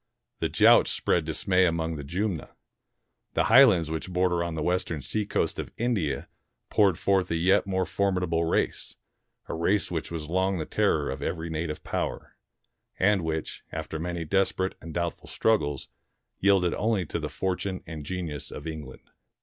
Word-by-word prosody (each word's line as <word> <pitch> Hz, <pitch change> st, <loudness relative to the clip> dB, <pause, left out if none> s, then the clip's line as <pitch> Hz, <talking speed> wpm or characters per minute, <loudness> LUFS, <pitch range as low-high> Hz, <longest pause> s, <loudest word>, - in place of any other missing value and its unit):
The -, -, 0 dB
Jauts -, -, +6 dB
spread 85 Hz, -3 st, +1 dB
dismay 90 Hz, +3 st, +2 dB
along 80 Hz, -1 st, -1 dB
the 75 Hz, -, -6 dB
Jumna. 90 Hz, +2 st, -2 dB, 0.9 s
The -, -, +3 dB
highlands 95 Hz, -, +6 dB
which 80 Hz, +3 st, -3 dB
border 90 Hz, -1 st, +1 dB
on 85 Hz, -1 st, -3 dB
the 80 Hz, -, -2 dB
western 90 Hz, -4 st, -1 dB
seacoast 105 Hz, +9 st, -1 dB
of -, -, -4 dB
India 110 Hz, -, -1 dB, 0.4 s
poured 100 Hz, -5 st, +4 dB
forth 95 Hz, -1 st, +1 dB
a 85 Hz, -, 0 dB
yet 90 Hz, +4 st, +3 dB
more 95 Hz, -1 st, 0 dB
formidable 90 Hz, -2 st, 0 dB
race, 80 Hz, -, -1 dB, 0.5 s
a -, -, -4 dB
race 95 Hz, +5 st, +1 dB
which 80 Hz, -2 st, -3 dB
was 80 Hz, -3 st, -5 dB
long 95 Hz, +3 st, +1 dB
the 80 Hz, -, -3 dB
terror -, -, +1 dB
of -, -, -6 dB
every 85 Hz, -1 st, -3 dB
native 80 Hz, -1 st, -3 dB
power, -, -, -4 dB, 0.6 s
and 95 Hz, -1 st, +3 dB
which, 80 Hz, -1 st, -3 dB
after 80 Hz, 0 st, -5 dB
many 85 Hz, 0 st, -3 dB
desperate 95 Hz, +2 st, +1 dB
and 85 Hz, -, -8 dB
doubtful 85 Hz, 0 st, -3 dB
struggles, 75 Hz, -11 st, 0 dB, 0.5 s
yielded 95 Hz, -3 st, +3 dB
only 105 Hz, -3 st, 0 dB
to -, -, -3 dB
the -, -, -4 dB
fortune 95 Hz, 0 st, -3 dB
and 80 Hz, -2 st, -7 dB
genius 80 Hz, -4 st, -4 dB
of -, -, -8 dB
England. 75 Hz, -5 st, -8 dB
85 Hz, 160 wpm, -27 LUFS, 80-95 Hz, 0.9 s, Jauts